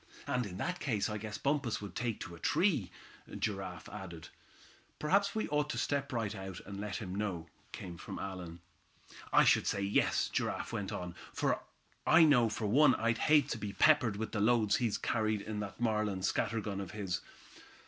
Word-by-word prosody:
"And 125 -3 0
in 90 -2 -7
that 180 - -2
case 110 -5 0
I 105 - -3
guess 105 0 -5
Bumpus 140 -5 0
would 100 -1 -7
take 115 -3 -2
to 90 - -6
a 85 - -11
tree," 150 - +2 0.5
Giraffe 95 -4 -3
added. 85 -6 -8 0.7
"Perhaps 200 +6 +2
we 220 - 0
ought 150 0 +1
to - - -2
step 140 -1 0
out 135 - -10
right 110 -3 -1
away, 95 -2 -6
and 100 -1 -6
let 105 -2 -4
him 95 -5 -4
know," 95 -5 -2 0.3
came 85 -2 -7
from - - -7
Allan. 90 -3 -6 0.7
"I - - +7
should - - +4
say, 100 - 0
yes," 100 +1 +2
Giraffe - - -2
went - - -3
on, 90 -1 -4 0.9
"I 165 +1 +8
know 125 -7 +5
for 110 +1 -3
one 130 +6 +5
I'd 115 0 0
hate 150 -3 +5
to 115 - -2
be 105 -1 -4
peppered 145 -8 +4
with 110 +1 -3
the 110 - -1
loads 110 -2 +4
he 120 -2 +1
carries 110 -2 0
in 105 +1 -4
that 100 0 -6
Marlin 105 -5 0
scatter 115 +3 0
gun 100 -1 -3
of 95 - -6
his. 100 -4 -2
105 Hz, 190 wpm, -33 LUFS, 100-125 Hz, 0.9 s, I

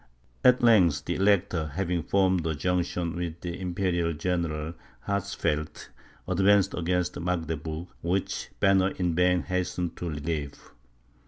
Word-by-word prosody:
At 125 -1 +5
length, 90 -11 +5
the 85 - -1
Elector, 95 -4 +2
having 90 -2 0
formed 95 -1 +2
a 80 - -1
junction 90 0 -1
with 85 -1 -4
the 85 0 -5
Imperial 85 -2 0
General 80 -1 -2 0.3
Hatzfeld, 80 -6 -2 0.4
advanced 95 +1 +3
against 90 0 -1
Magdeburg, 80 -2 -3 0.2
which 90 +3 -2
Banner 95 -1 +4
in 90 -2 0
vain 90 +1 +3
hastened 90 -1 -2
to 90 - -4
relieve. 75 -1 -4
90 Hz, 120 wpm, -27 LUFS, 80-95 Hz, 0.4 s, At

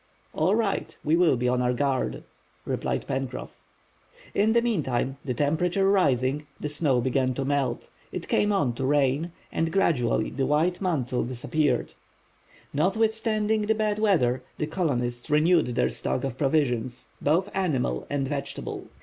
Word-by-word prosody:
"All 180 +7 +2
right, 220 -3 -1
we 155 +2 +3
will 170 -6 +4
be 125 +1 0
on 125 0 +2
our 125 0 +2
guard," 135 0 -1 0.4
replied - - -2
Pencroff. 130 - -4 0.8
In 215 +2 +3
the 235 - +4
meantime, 135 - 0
the 125 -4 -2
temperature 175 +8 +1
rising, 145 -7 +2
the 150 - -3
snow 145 -4 +1
began 130 0 +1
to 135 - -2
melt, 135 -4 -1 0.2
it - - -5
came 205 - +2
on 145 -12 +1
to 125 - -4
rain, 145 +3 +2 0.2
and 165 0 0
gradually 125 - +1
the 135 +1 -1
white 165 +5 +1
mantle 130 -9 0
disappeared. 130 +2 -1 0.8
Notwithstanding 215 +5 +1
the 220 - +3
bad 215 -1 0
weather 130 - +2 0.2
the 150 - -1
colonists 125 -7 -2
renewed 160 +2 +4
their - - +2
stock 125 - -2
of 135 -3 -2
provisions, 130 -4 0
both 175 +7 +2
animal 135 - 0
and 140 -2 -1
vegetable. 140 0 -5
145 Hz, 150 wpm, -26 LUFS, 130-180 Hz, 0.8 s, will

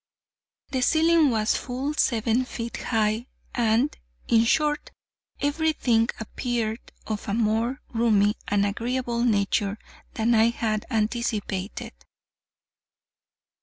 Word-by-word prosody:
The 260 - 0
ceiling 320 +2 +4
was 220 -2 +1
full 265 +3 -3
seven 235 -3 +1
feet 235 -2 -5
high, 220 +1 0 0.3
and, 235 +4 +2 0.3
in 230 -1 +4
short, 295 +4 +1 0.5
every 315 +3 +1
thing 230 -5 +2
appeared 225 0 -2 0.3
of 215 -1 -4
a 200 - 0
more 230 +3 0
roomy 215 -3 +3
and 205 0 +2
agreeable 235 +3 -1
nature 205 -2 +1 0.4
than 230 +1 +2
I 220 0 +5
had 220 -2 -2
anticipated. 215 -4 -2
230 Hz, 105 wpm, -25 LUFS, 215-250 Hz, 0.5 s, I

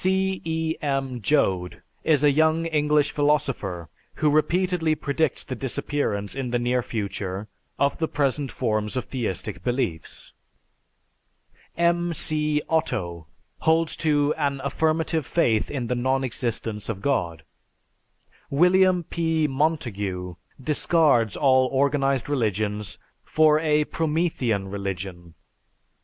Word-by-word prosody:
C. 190 0 +1
E. 160 0 -2
M. 135 -4 -2
Joad 95 -10 0 0.2
is 150 -3 +3
a 145 - +6
young 160 +3 +2
English 150 -2 +2
philosopher 135 - 0 0.3
who 150 -1 +2
repeatedly 170 +1 +2
predicts 150 -1 -1
the - - -6
disappearance 130 -5 -2
in 135 -2 -3
the 120 - +1
near 125 +1 +1
future 100 -3 -4 0.3
of 140 0 +1
the 160 - 0
present 140 -2 -1
forms 110 -1 -1
of 130 - -2
theistic 110 -9 -4
beliefs. 120 -11 -3 1.4
M. 170 0 +1
C. 150 -1 +1
Otto 85 - -1 0.3
holds 160 0 +2
to 145 -2 +2
"An 140 -2 0
affirmative 160 +3 0
faith 115 -11 +1
in 130 -4 -3
the 125 - -1
non 130 +2 0
existence 115 -4 -3
of 100 -3 -4
God." 85 - -1 1.1
William 180 +4 +4
P. 160 -1 0
Montague 115 - -2 0.3
discards 140 - +2
all 130 -2 +4
organized 135 -1 +1
religions 105 -6 -1 0.3
for 155 -1 +4
a 150 -1 +2
"Promethean 150 - -1
Religion." 95 -3 -6
140 Hz, 115 wpm, -24 LUFS, 110-155 Hz, 1.4 s, a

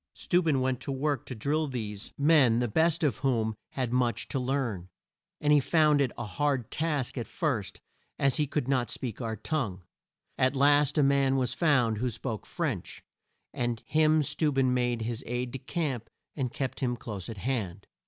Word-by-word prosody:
Steu 180 - +1
ben 155 -6 +1
went 130 -1 0
to - - -5
work 140 -1 -1
to 125 - -5
drill 150 +7 0
these 110 -5 -5
men, 140 -6 +5
the 120 0 +1
best 160 +8 +2
of 145 - +2
whom 115 -5 0 0.2
had 125 -3 -2
much 120 -2 +1
to 135 - -1
learn, 125 -9 -2 0.5
and 150 0 +3
he 145 - +7
found 150 0 +3
it 130 -3 +1
a 120 - -3
hard 130 +3 -1
task 150 -5 -1
at 115 - -4
first 130 - -2 0.4
as 140 -1 +2
he 150 -2 +1
could 145 -2 -2
not 130 -3 +1
speak 125 -2 -4
our 110 -1 -2
tongue. 110 - -3 0.6
At 130 +2 +3
last 145 +2 +4
a 150 - +5
man 135 -1 +3
was 125 -2 0
found 125 -9 +2
who 125 +2 0
spoke 115 -2 -5
French, - - -3 0.5
and 120 -2 -2
him 155 0 +3
Steu 150 +2 0
ben 135 -2 +2
made 120 -2 0
his 115 0 -3
aide 125 +1 -2
de 135 - -5
camp 135 -7 -3 0.3
and 130 -5 -2
kept 135 0 -3
him 125 -3 -1
close 105 -5 -6
at 115 - -6
hand. 100 -5 -3
130 Hz, 190 wpm, -29 LUFS, 120-145 Hz, 0.6 s, he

